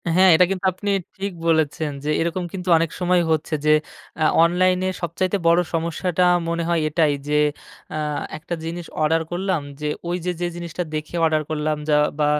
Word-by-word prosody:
হ্যাঁ, 185 Hz, +1 st, +6 dB
এটা 180 Hz, -, +6 dB
কিন্তু 195 Hz, 0 st, -3 dB
আপনি 205 Hz, +3 st, -4 dB, 0.3 s
ঠিক 200 Hz, 0 st, -3 dB, 0.2 s
বলেছেন 160 Hz, -1 st, +1 dB
যে, 150 Hz, -, -2 dB
এরকম 170 Hz, +2 st, -1 dB
কিন্তু 185 Hz, -1 st, -6 dB
অনেক 165 Hz, 0 st, +1 dB
সময় 180 Hz, 0 st, +3 dB
হচ্ছে 160 Hz, +1 st, -1 dB
যে, 155 Hz, -, +5 dB, 0.5 s
আ -, -, +4 dB, 0.2 s
অনলাইনে 180 Hz, +2 st, +2 dB
সবচাইতে 180 Hz, +3 st, -1 dB
বড় 170 Hz, +1 st, +5 dB
সমস্যাটা 170 Hz, +2 st, 0 dB, 0.3 s
মনে 170 Hz, 0 st, -1 dB
হয় 170 Hz, -1 st, +2 dB
এটাই 155 Hz, -2 st, +2 dB
যে, 150 Hz, -, -1 dB, 0.6 s
আ -, -, -3 dB, 0.4 s
একটা 160 Hz, +3 st, -6 dB
জিনিস 170 Hz, +1 st, -5 dB, 0.2 s
অর্ডার 160 Hz, +2 st, +3 dB
করলাম, 185 Hz, -2 st, -1 dB, 0.2 s
যে 150 Hz, -, -1 dB, 0.2 s
ওই 175 Hz, -, 0 dB
যে, 180 Hz, -, +1 dB
যে 175 Hz, -, +1 dB
জিনিসটা 170 Hz, 0 st, -4 dB
দেখে 155 Hz, +2 st, -4 dB
অর্ডার 155 Hz, -1 st, +2 dB
করলাম 155 Hz, 0 st, -1 dB
যা 150 Hz, -, +4 dB, 0.2 s
বা 150 Hz, -, +3 dB
170 Hz, 180 wpm, -22 LUFS, 155-180 Hz, 0.6 s, হ্যাঁ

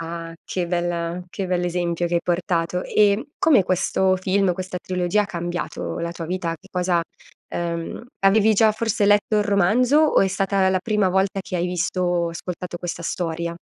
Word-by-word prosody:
Ah, 165 Hz, 0 st, -6 dB
che 180 Hz, -2 st, -2 dB
bella 175 Hz, 0 st, -1 dB
che 190 Hz, +1 st, -4 dB
bell'esempio 175 Hz, -1 st, 0 dB
che 175 Hz, -, -2 dB
hai 170 Hz, -, +3 dB
portato, 175 Hz, 0 st, -1 dB
e 210 Hz, +7 st, +2 dB
come 270 Hz, -, +4 dB
questo 185 Hz, +1 st, +1 dB
film, 190 Hz, 0 st, +1 dB
questa 185 Hz, 0 st, -5 dB
trilogia 180 Hz, +3 st, 0 dB
ha -, -, -5 dB
cambiato 175 Hz, -1 st, -4 dB
la 170 Hz, 0 st, -3 dB
tua 165 Hz, -1 st, -6 dB
vita? 175 Hz, -2 st, -2 dB
Che 195 Hz, -, -20 dB
cosa 180 Hz, -2 st, +1 dB, 0.5 s
ehm, 170 Hz, +4 st, -4 dB, 0.2 s
avevi 215 Hz, +2 st, +4 dB
già 215 Hz, +1 st, +5 dB
forse 215 Hz, -1 st, 0 dB
letto 205 Hz, +1 st, +3 dB
il -, -, +3 dB
romanzo 210 Hz, +8 st, +3 dB
o 310 Hz, -1 st, +4 dB
è 195 Hz, -, +3 dB
stata 195 Hz, 0 st, +1 dB
la 190 Hz, 0 st, +2 dB
prima 210 Hz, 0 st, +1 dB
volta 190 Hz, +2 st, +1 dB
che 190 Hz, -1 st, -5 dB
hai 175 Hz, +1 st, 0 dB
visto 180 Hz, +1 st, -2 dB
o 175 Hz, -1 st, +1 dB
ascoltato 175 Hz, +1 st, -6 dB
questa 170 Hz, -1 st, -5 dB
storia? 170 Hz, 0 st, -3 dB
180 Hz, 180 wpm, -22 LUFS, 170-200 Hz, 0.5 s, già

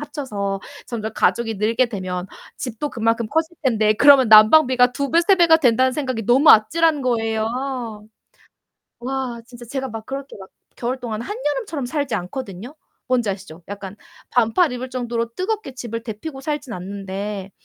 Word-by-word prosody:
합쳐서 215 Hz, -10 st, -4 dB, 0.3 s
점점 220 Hz, -3 st, -4 dB
가족이 225 Hz, 0 st, +1 dB
늘게 225 Hz, +5 st, +2 dB
되면 185 Hz, -4 st, -4 dB, 0.3 s
집도 250 Hz, +4 st, -4 dB
그만큼 230 Hz, -1 st, 0 dB
커질 320 Hz, +2 st, -1 dB
텐데 215 Hz, -4 st, +3 dB
그러면 275 Hz, -1 st, +6 dB
난방비가 250 Hz, +3 st, +6 dB
2 280 Hz, 0 st, -3 dB
배, 335 Hz, +1 st, +4 dB
3 390 Hz, +3 st, +5 dB
배가 340 Hz, -3 st, +6 dB
된다는 260 Hz, -3 st, +3 dB
생각이 255 Hz, -6 st, -3 dB
너무 265 Hz, +7 st, +6 dB
아찔한 305 Hz, +6 st, +4 dB
거예요. 225 Hz, -3 st, 0 dB, 1.5 s
와 255 Hz, -2 st, -4 dB
진짜 240 Hz, -1 st, -12 dB
제가 265 Hz, +2 st, -4 dB
막 225 Hz, -1 st, -7 dB
그렇게 275 Hz, -2 st, -7 dB
막 190 Hz, -, -10 dB, 0.3 s
겨울 250 Hz, +2 st, -2 dB
동안 225 Hz, -2 st, -4 dB
한여름처럼 330 Hz, -, -3 dB
살지 285 Hz, -1 st, -2 dB
않거든요. 200 Hz, +5 st, -6 dB, 0.3 s
뭔지 245 Hz, -4 st, +1 dB
아시죠? 190 Hz, -4 st, -7 dB
약간 200 Hz, 0 st, -8 dB, 0.3 s
반팔 245 Hz, +7 st, +2 dB
입을 250 Hz, +1 st, -5 dB
정도로 235 Hz, -2 st, -3 dB
뜨겁게 375 Hz, -7 st, -3 dB
집을 230 Hz, -2 st, -5 dB
데우고 245 Hz, +6 st, -7 dB
살지는 285 Hz, -3 st, -4 dB
않는데 195 Hz, +1 st, -6 dB
245 Hz, 335 characters per minute, -21 LUFS, 215-275 Hz, 1.5 s, 그러면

